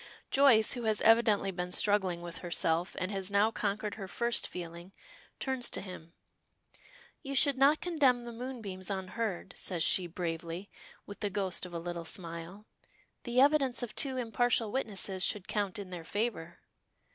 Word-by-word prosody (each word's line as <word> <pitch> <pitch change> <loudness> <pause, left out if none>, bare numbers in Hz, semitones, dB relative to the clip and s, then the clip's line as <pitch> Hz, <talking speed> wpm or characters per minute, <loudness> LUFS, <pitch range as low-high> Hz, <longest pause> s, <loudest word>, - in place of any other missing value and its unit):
Joyce, 265 -6 +5
who 245 -3 -4
has 215 -1 +2
evidently 220 -3 +4
been 180 -1 -4
struggling 185 -3 +1
with 170 -1 -7
herself, 170 0 0
and 185 +2 -2
has 195 -1 -2
now 205 +2 +3
conquered 210 -1 -2
her 195 - -5
first 235 +6 +1
feeling, 170 +1 -8 0.5
turns 260 -2 0
to - - -2
him. 180 -3 -9 1.1
"You 275 -2 -5
should 280 +1 +5
not 275 +3 +4
condemn 275 -9 +2
the 235 - -6
moonbeams 225 -7 -6
unheard," 190 0 -3
says 175 -4 -1
she, 180 -2 +3
bravely, 170 +2 -5 0.3
with 205 - -9
the 205 - -1
ghost 190 -2 -2
of 175 - -13
a - - -1
little 170 0 -5
smile. 170 +4 -6 0.6
"The 240 0 +1
evidence 275 -3 +3
of 230 - -5
two 265 -2 0
impartial 235 -2 +1
witnesses 200 -6 0
should 205 -2 0
count 200 -3 -1
in 195 -3 -7
their 175 -2 -6
favor." 200 -3 -3
200 Hz, 160 wpm, -31 LUFS, 180-235 Hz, 1.1 s, Joyce